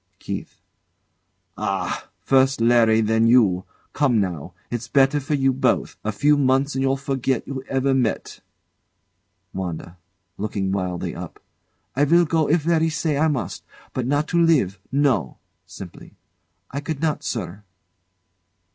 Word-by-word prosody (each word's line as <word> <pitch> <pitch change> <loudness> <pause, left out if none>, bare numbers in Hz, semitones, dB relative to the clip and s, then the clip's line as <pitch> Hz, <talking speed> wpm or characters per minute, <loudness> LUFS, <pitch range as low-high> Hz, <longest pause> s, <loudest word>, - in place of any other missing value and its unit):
KEITH. - - -7 1.0
Ah! - - -2
First 135 -1 +3
Larry, 115 -1 +4
then 110 +1 +2
you! 105 -7 +4 0.3
Come 130 -6 +2
now. 90 -3 -3 0.2
It's 120 0 -3
better 135 +3 +3
for 150 +2 -1
you 135 -1 +2
both. 130 -1 0
A 110 - -1
few 145 +8 +3
months, 135 +1 +2
and 135 - -1
you'll 135 0 +1
forget 135 -2 -2
you 135 -1 -4
ever 135 0 +1
met. 125 -4 -1 1.1
WANDA. 90 -1 -6 0.4
[Looking 100 -2 -2
wildly 90 -2 -2
up] - - -8 0.6
I 145 +2 +3
will 170 +4 +4
go 160 -1 +1
if 160 0 +2
Larry 165 -1 +2
say 155 -1 -1
I 155 +3 +2
must. 145 -5 -3 0.3
But 125 -2 -2
not 145 +2 +1
to 170 -1 +2
live. 130 - +2
No! 135 - +1 0.3
[Simply] 90 -3 -11 0.6
I 140 - -3
could 145 0 -4
not, 155 -1 0
sir. 105 -3 -5
130 Hz, 140 wpm, -22 LUFS, 110-145 Hz, 1.1 s, Larry